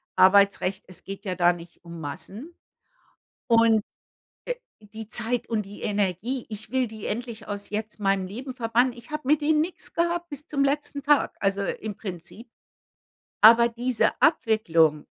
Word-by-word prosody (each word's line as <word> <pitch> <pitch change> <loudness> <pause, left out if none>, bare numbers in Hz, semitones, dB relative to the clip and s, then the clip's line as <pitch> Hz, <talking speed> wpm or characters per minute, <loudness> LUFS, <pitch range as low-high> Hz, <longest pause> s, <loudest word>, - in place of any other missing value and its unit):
Arbeitsrecht, 195 0 +4
es 185 -2 -12
geht 195 +1 -8
ja 185 - -1
da 175 0 +4
nicht 170 -1 -11
um 170 -1 -9
Massen. 195 - -8 0.9
Und, 230 -2 +5 0.6
äh, - - -1 0.3
die 220 +1 -10
Zeit 235 +2 -1
und 220 -2 0
die 200 +1 -12
Energie, 205 +5 -1
ich 215 0 -8
will 255 -1 +1
die 215 -1 -8
endlich 230 -1 -5
aus 205 -1 -5
jetzt 215 +1 -4
meinem 195 -2 +1
Leben 250 +7 -7
verbannen. 245 +1 +1
Ich 240 +3 -14
habe 300 - -3
mit 300 +2 +3
denen 305 +1 +2
nix 340 +3 -4
gehabt 345 0 0
bis 290 0 -8
zum 280 -2 +1
letzten 285 0 -1
Tag, 295 +1 +2
also 195 0 0
im 210 0 -4
Prinzip 190 +4 -8 0.9
aber 230 +2 +8
diese 240 0 +1
Abwicklung 170 - +3
220 Hz, 160 wpm, -25 LUFS, 195-255 Hz, 0.9 s, aber